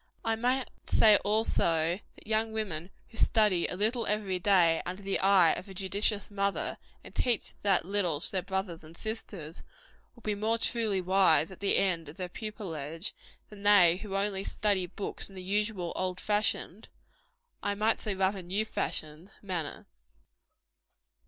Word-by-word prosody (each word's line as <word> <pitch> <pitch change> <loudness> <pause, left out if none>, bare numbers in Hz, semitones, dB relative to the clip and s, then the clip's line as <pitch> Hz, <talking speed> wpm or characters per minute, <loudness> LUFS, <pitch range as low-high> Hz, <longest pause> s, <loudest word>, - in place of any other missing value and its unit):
I 225 0 +2
might 250 +3 0 0.2
say, 215 -2 +6
also, 175 -5 +1 0.2
that - - -17
young 220 +1 +1
women 185 -6 -3 0.2
who 225 - -12
study 210 -8 +3
a - - -4
little 220 +4 0
every 205 -3 -1
day 175 -4 +4
under 185 +3 -6
the 195 0 -1
eye 190 -4 +5
of 195 - -7
a 190 - -10
judicious 200 +2 0
mother, 200 0 -1 0.2
and - - -13
teach 240 -4 0
that 195 -4 +2
little 180 -6 0
to 170 - -4
their 190 - 0
brothers 185 -2 -4
and 160 +2 -14
sisters, 200 -8 -6 0.5
will 235 - -18
be 210 - 0
more 215 +3 +1
truly 225 -4 +2
wise 185 -3 +3
at 190 - -11
the 200 - +2
end 170 -5 0
of 150 - -12
their 180 -1 -4
pupilage, 175 -5 -5 0.4
than 210 -1 -12
they 195 -4 +6
who 200 0 -6
only 195 -1 0
study 200 -3 0
books 200 +3 -4
in 195 - -14
the 185 - -8
usual 200 -2 -1
old 185 0 -2
fashioned 210 -1 -1 0.7
I 205 - -1
might 215 +2 +1
say, 210 -2 -2
rather, 190 +1 0
new 190 +5 -1
fashioned 155 -4 -3
manner. 175 -6 -4
195 Hz, 165 wpm, -30 LUFS, 180-210 Hz, 0.7 s, say